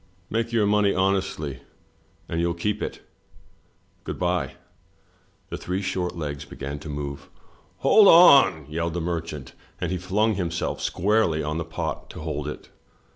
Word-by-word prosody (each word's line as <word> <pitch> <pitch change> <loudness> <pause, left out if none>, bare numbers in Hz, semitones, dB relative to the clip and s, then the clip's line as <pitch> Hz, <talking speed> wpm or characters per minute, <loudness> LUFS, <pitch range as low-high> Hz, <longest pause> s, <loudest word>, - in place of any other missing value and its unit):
Make 115 +1 -1
your 115 -3 +2
money 105 -1 +3
honestly, 95 -7 0 0.7
and 80 - -2
you'll 85 0 0
keep 105 +4 -2
it - - -4 0.5
— - - -39
Good - - -5
bye." - - -1 1.0
The - - -3
three 95 +2 -3
short 90 -2 -2
legs 75 -3 -4
began 70 +1 -6
to 80 - -9
move. 70 -1 -5 0.6
"Hold 215 -2 +7
on!" 135 - +7
yelled 85 +2 -3
the - - 0
merchant, 80 -4 -4 0.3
and 90 - -2
he 90 - -1
flimg 105 +5 +1
himself 85 -2 -2
squarely 95 -5 +1
on 75 +2 -2
the 85 - -3
pot 80 - -4
to - - -9
hold 75 -2 -4
it. 75 - -7
85 Hz, 155 wpm, -25 LUFS, 75-100 Hz, 1.0 s, Hold